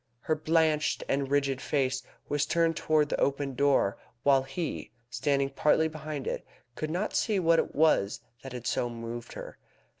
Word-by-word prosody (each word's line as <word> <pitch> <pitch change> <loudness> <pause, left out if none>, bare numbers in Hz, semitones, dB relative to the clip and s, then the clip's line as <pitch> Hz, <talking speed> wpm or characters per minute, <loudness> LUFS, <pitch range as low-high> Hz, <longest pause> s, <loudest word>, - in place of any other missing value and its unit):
Her 155 - 0
blanched 155 0 +2
and 135 -1 0
rigid 140 -2 +1
face 130 -3 0 0.3
was 145 0 0
turned 165 -1 +2
towards 155 -1 +2
the - - -1
open 140 0 0
door, 135 -7 +2 0.2
while 135 -1 +5
he, 135 +5 -4 0.2
standing 140 +2 +1
partly 150 +3 +3
behind 155 -3 -6
it, - - -3 0.3
could 155 +5 -4
not 180 +6 -2
see 215 -3 +1
what 165 -2 +4
it - - -2
was 150 -10 +3 0.2
that 135 - -8
had 120 -1 -7
so 120 - 0
moved 115 0 -7
her. - - -9
145 Hz, 170 wpm, -29 LUFS, 135-155 Hz, 0.3 s, while